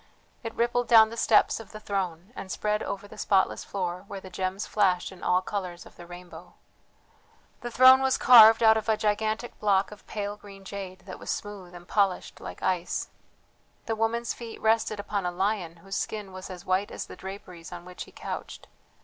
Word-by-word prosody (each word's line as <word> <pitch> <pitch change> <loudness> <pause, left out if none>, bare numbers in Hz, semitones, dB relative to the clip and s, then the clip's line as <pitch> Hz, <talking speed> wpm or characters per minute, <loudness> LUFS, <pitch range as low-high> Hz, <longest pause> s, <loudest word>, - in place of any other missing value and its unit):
It 225 - -6
rippled 240 +1 +1
down 220 -2 +7
the - - -6
steps 225 -1 +3
of 225 - -11
the 215 - -7
throne, 190 -1 -4
and 190 - -7
spread 210 0 -1
over 200 +1 -5
the - - -13
spotless 190 -2 +2
floor 180 -2 -4
where 200 - -6
the 190 -1 -12
gems 185 +2 -3
flashed 185 -4 +1
in 190 - -13
all 180 +1 +2
colours 180 -3 -5
of - - -16
the 175 - -12
rainbow. 175 +1 -12 1.0
The 240 - -5
throne 260 +2 +7
was 265 -1 +2
carved 225 -2 +8
out 220 0 +7
of 220 0 -3
a 220 - +3
gigantic 215 +3 -1
block 200 -2 +2
of 210 - -14
pale 205 -1 -4
green 195 -2 -13
jade 190 -2 -7
that 185 -1 -10
was - - -9
smooth 195 -4 -5
and 175 0 -12
polished 195 -3 0
like - - -8
ice. 180 -1 -1 0.8
The 225 - -1
woman's 225 +1 -1
feet 230 -2 -9
rested 220 -1 +1
upon 205 -1 -2
a - - -1
lion 185 -2 -1
whose 195 0 -3
skin 210 -3 -4
was 185 0 -9
as 180 0 -9
white 185 +2 +1
as - - -6
the - - -11
draperies 185 -3 -9
on 175 0 -8
which 180 0 -8
he - - -17
couched. - - -7
200 Hz, 200 wpm, -27 LUFS, 185-220 Hz, 1.0 s, carved